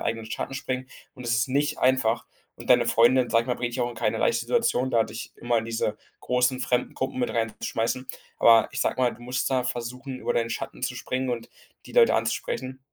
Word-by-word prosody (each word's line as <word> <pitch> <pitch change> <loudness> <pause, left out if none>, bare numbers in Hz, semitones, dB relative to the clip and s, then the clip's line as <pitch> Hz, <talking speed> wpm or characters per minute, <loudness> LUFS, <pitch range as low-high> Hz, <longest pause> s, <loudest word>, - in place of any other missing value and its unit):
eigenen 115 -1 -2
Schatten 135 - -4
springen 130 -1 -4 0.3
und 125 - -10
es 115 -1 +1
ist 115 +2 +1
nicht 145 +3 0
einfach. 130 -3 +2 0.3
Und - - -8
deine - - +6
Freundin, 120 +2 +4
sage 115 0 +4
ich - - -13
mal, 125 - +1
bringt 120 -1 -3
dich 130 - -2
auch 120 - +1
in 115 - -11
keine - - 0
leichte 480 - +1
Situation, 130 - +1
da 115 -3 +3
dich 115 +1 -7
immer 120 -1 0
diese 115 -1 -2 0.2
großen 125 +1 +1
fremden 125 0 0
Gruppen 130 0 -3
mit 125 - 0
rein 115 -2 -1
zu - - -2
schmeißen. 115 +3 -1 0.3
Aber 115 -1 +6
ich - - -4
sage - - 0
mal, 120 - +3
du - - -14
musst 125 +1 -1
da 130 -2 +1
versuchen, 125 +2 -5
über - - 0
deinen 115 -1 0
Schatten - - -5
zu - - -1
springen 130 0 -2
und 115 -1 -4 0.4
die - - -12
Leute 480 -1 +6
anzusprechen. 130 0 -2
125 Hz, 230 wpm, -26 LUFS, 115-130 Hz, 0.4 s, deine